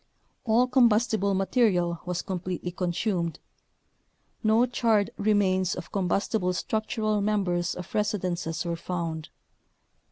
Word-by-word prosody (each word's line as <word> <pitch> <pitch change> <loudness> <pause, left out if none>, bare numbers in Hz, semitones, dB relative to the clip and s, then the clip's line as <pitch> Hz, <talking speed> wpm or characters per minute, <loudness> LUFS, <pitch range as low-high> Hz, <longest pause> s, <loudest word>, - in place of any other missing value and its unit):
All 235 +2 +4
combustible 225 -5 +3
material 190 -4 +2
was 180 -1 -2
completely 180 -1 -4
consumed. 175 -1 -1 1.1
No 220 +2 +4
charred 225 -4 +1
remains 190 -3 +2
of 180 - -8
combustible 190 0 0
structural 215 +2 -1
members 185 -4 0
of 180 - -8
residences 180 -5 -1
were 170 0 -1
found. 165 -2 -4
190 Hz, 100 wpm, -27 LUFS, 175-215 Hz, 1.1 s, All